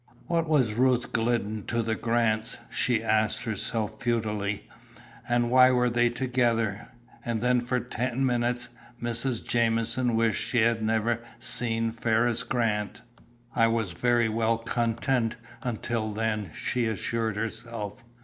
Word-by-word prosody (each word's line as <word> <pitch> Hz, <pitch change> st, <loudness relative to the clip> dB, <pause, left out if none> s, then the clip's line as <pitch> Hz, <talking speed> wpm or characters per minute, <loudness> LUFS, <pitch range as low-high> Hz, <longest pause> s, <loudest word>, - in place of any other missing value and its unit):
What 165 Hz, -2 st, 0 dB
was 130 Hz, -9 st, +3 dB
Ruth 125 Hz, +1 st, +2 dB
Glidden 115 Hz, -2 st, 0 dB
to 120 Hz, -1 st, 0 dB
the 110 Hz, 0 st, -1 dB
Grants? 115 Hz, -1 st, 0 dB
she 120 Hz, -3 st, +1 dB
asked 110 Hz, -1 st, +1 dB
herself 110 Hz, -1 st, -2 dB
futilely, 105 Hz, -3 st, -1 dB, 0.6 s
and 120 Hz, 0 st, +1 dB
why 130 Hz, 0 st, +7 dB
were 125 Hz, -1 st, +2 dB
they 120 Hz, 0 st, +3 dB
together? 120 Hz, -4 st, 0 dB, 0.4 s
And 115 Hz, -2 st, -2 dB
then 125 Hz, +1 st, +2 dB
for 125 Hz, +1 st, -1 dB
ten 125 Hz, +2 st, -2 dB
minutes 120 Hz, -1 st, 0 dB, 0.3 s
Mrs. 120 Hz, +1 st, 0 dB
Jamieson 115 Hz, +1 st, +1 dB
wished 115 Hz, -1 st, +1 dB
she 120 Hz, -, +1 dB
had 115 Hz, 0 st, +2 dB
never 110 Hz, +1 st, 0 dB, 0.2 s
seen 115 Hz, -1 st, +3 dB
Ferriss 115 Hz, +1 st, +1 dB
Grant. 110 Hz, -4 st, -1 dB, 0.5 s
"I 115 Hz, -, +4 dB
was 115 Hz, -4 st, 0 dB
very 120 Hz, +5 st, +2 dB
well 115 Hz, +1 st, +1 dB
content 115 Hz, +1 st, -1 dB, 0.3 s
until 115 Hz, -2 st, -2 dB
then," 105 Hz, -2 st, -2 dB
she 120 Hz, -2 st, -1 dB
assured 110 Hz, +1 st, -2 dB
herself. 115 Hz, 0 st, -5 dB
115 Hz, 130 wpm, -27 LUFS, 110-120 Hz, 0.6 s, why